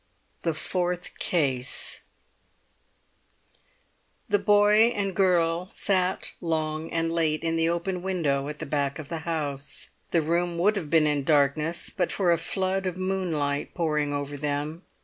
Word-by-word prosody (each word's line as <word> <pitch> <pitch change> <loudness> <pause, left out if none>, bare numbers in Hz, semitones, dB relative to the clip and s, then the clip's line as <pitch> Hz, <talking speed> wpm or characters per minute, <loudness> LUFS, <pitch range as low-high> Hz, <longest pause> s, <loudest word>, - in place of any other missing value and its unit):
THE 165 -2 -1
FOURTH 180 +2 -3
CASE 135 -7 +1 2.3
The 205 - +2
boy 205 +2 +5
and 195 -2 -1
girl 175 -2 +2
sat 185 -1 0
long 160 -1 -1
and 165 0 -1
late 160 -2 +1
in 165 0 0
the 165 0 +2
open 175 +2 -2
window 150 -7 0
at 150 - -6
the - - -5
back 140 -1 -1
of 155 -3 -8
the 165 - -3
house. 145 -4 -3 0.2
The 165 -2 +2
room 170 +2 0
would 205 +5 +3
have 170 -7 -4
been 160 -1 +4
in 145 -2 +1
darkness 150 +3 +2
but 180 -3 0
for 185 -3 +2
a 170 - +3
flood 190 +2 -1
of 180 -1 -3
moonlight 175 -7 -1
pouring 150 -4 0
over 145 0 -3
them. 150 +3 -3
165 Hz, 150 wpm, -26 LUFS, 150-180 Hz, 2.3 s, boy